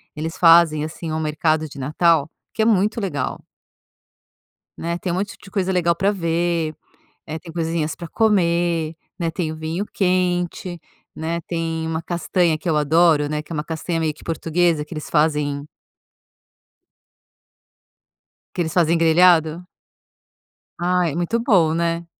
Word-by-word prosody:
Eles 160 Hz, +2 st, -5 dB
fazem, 165 Hz, -3 st, +5 dB
assim, 160 Hz, +1 st, -6 dB
um 155 Hz, -, -1 dB
mercado 155 Hz, 0 st, 0 dB
de 145 Hz, -, -13 dB
Natal 155 Hz, +2 st, +2 dB, 0.2 s
que -, -, -1 dB
é -, -, +3 dB
muito 215 Hz, +1 st, +2 dB
legal. 145 Hz, -9 st, -3 dB, 1.3 s
Né, 170 Hz, +1 st, -3 dB
tem 180 Hz, 0 st, -3 dB
um -, -, -1 dB
monte 195 Hz, +2 st, -3 dB
de 195 Hz, -, -13 dB
coisa 190 Hz, -1 st, -1 dB
legal 170 Hz, -2 st, +2 dB
para 195 Hz, +4 st, +1 dB
ver, 170 Hz, -3 st, -1 dB, 0.5 s
eh, 155 Hz, 0 st, -5 dB
tem 165 Hz, 0 st, -11 dB
coisinhas 165 Hz, -1 st, -2 dB
para 170 Hz, -, -8 dB
comer, 170 Hz, -6 st, +1 dB, 0.2 s
né, 170 Hz, -2 st, 0 dB
tem 165 Hz, -1 st, -3 dB
o -, -, -6 dB
vinho 160 Hz, +5 st, -3 dB
quente, 180 Hz, -2 st, -1 dB, 0.3 s
né, 165 Hz, +2 st, -3 dB
tem 165 Hz, -1 st, -3 dB
uma 160 Hz, 0 st, -2 dB
castanha 170 Hz, -1 st, 0 dB
que 170 Hz, -, -4 dB
eu 155 Hz, -, +2 dB
adoro, 155 Hz, 0 st, +3 dB
né, 150 Hz, 0 st, -2 dB
que 150 Hz, -, -16 dB
é -, -, -2 dB
uma 150 Hz, -1 st, -3 dB
castanha 165 Hz, +1 st, -3 dB
meio 160 Hz, -2 st, 0 dB
que -, -, -17 dB
portuguesa 165 Hz, -1 st, 0 dB
que 150 Hz, -, -9 dB
eles 155 Hz, -2 st, -6 dB
fazem 150 Hz, -2 st, +1 dB, 2.9 s
que -, -, 0 dB
eles 160 Hz, -1 st, -2 dB
fazem 170 Hz, -1 st, +3 dB
grelhado. 165 Hz, 0 st, +4 dB, 1.1 s
Ai, 175 Hz, -3 st, +1 dB
muito 175 Hz, +7 st, 0 dB
bom, 190 Hz, -, +3 dB
né? 170 Hz, 0 st, -1 dB
165 Hz, 150 wpm, -21 LUFS, 155-175 Hz, 2.9 s, fazem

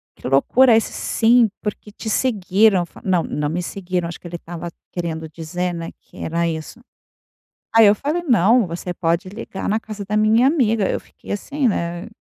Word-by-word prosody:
"Que -, -, -7 dB
loucura", 225 Hz, -, +5 dB
"Isso 225 Hz, -, +1 dB
sim, 230 Hz, -1 st, +3 dB
porque 210 Hz, 0 st, -5 dB
te 220 Hz, -, -6 dB
seguiram.", 210 Hz, -4 st, +3 dB
eu -, -, -3 dB
f -, -, -15 dB
"Não, 185 Hz, -3 st, +2 dB
não 150 Hz, 0 st, -2 dB
me 170 Hz, +4 st, -2 dB
seguiram", 180 Hz, -1 st, -3 dB
acho 170 Hz, -, -8 dB
que -, -, -10 dB
ele 175 Hz, 0 st, -6 dB
estava 170 Hz, +1 st, -7 dB, 0.2 s
querendo 160 Hz, -2 st, -4 dB
dizer, 170 Hz, +3 st, -3 dB
né, 165 Hz, -1 st, -5 dB
que -, -, -20 dB
era 170 Hz, +1 st, -1 dB
isso. 160 Hz, +8 st, -5 dB, 0.9 s
Aí 225 Hz, -1 st, +8 dB
eu 205 Hz, -, +7 dB
falei: 305 Hz, -, -2 dB
"Não, 235 Hz, -, +4 dB
você 175 Hz, +1 st, -5 dB
pode 170 Hz, +2 st, 0 dB
ligar 195 Hz, 0 st, -6 dB
na 210 Hz, -, +2 dB
casa 215 Hz, -2 st, -7 dB
da 210 Hz, -, -1 dB
minha 220 Hz, +4 st, +4 dB
amiga!" 225 Hz, -, +2 dB
Eu -, -, -1 dB
fiquei -, -, -9 dB
assim, 275 Hz, +6 st, -1 dB
né, 170 Hz, -3 st, -2 dB
195 Hz, 190 wpm, -21 LUFS, 170-225 Hz, 0.9 s, Aí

